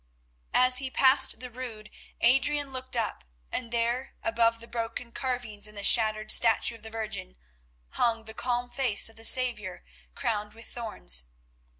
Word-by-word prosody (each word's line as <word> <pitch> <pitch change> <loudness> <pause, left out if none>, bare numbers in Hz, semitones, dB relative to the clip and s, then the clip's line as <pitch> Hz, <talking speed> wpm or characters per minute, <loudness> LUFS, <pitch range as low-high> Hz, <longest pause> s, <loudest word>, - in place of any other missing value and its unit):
As 255 0 +6
he 270 -1 -4
passed 260 0 +4
the 250 -1 -8
Rood 230 -4 -8 0.3
Adrian 275 +3 +2
looked 260 -1 -4
up, 220 - -3 0.3
and 235 -2 -4
there, 240 +3 -2
above 230 0 +1
the 230 - -12
broken 235 0 -5
carvings 245 -5 -3
and 210 0 -12
the 200 - -4
shattered 215 -1 +5
statue 230 +1 +5
of 230 - -14
the 220 - -10
Virgin, 215 - -6 0.5
hung 230 - 0
the 220 - -7
calm 245 +1 -3
face 245 -6 -1
of 225 - -14
the 225 - -12
Saviour 225 -7 +2 0.3
crowned 210 -4 -3
with 230 - -13
thorns. 60 - -4
230 Hz, 160 wpm, -27 LUFS, 215-250 Hz, 0.5 s, As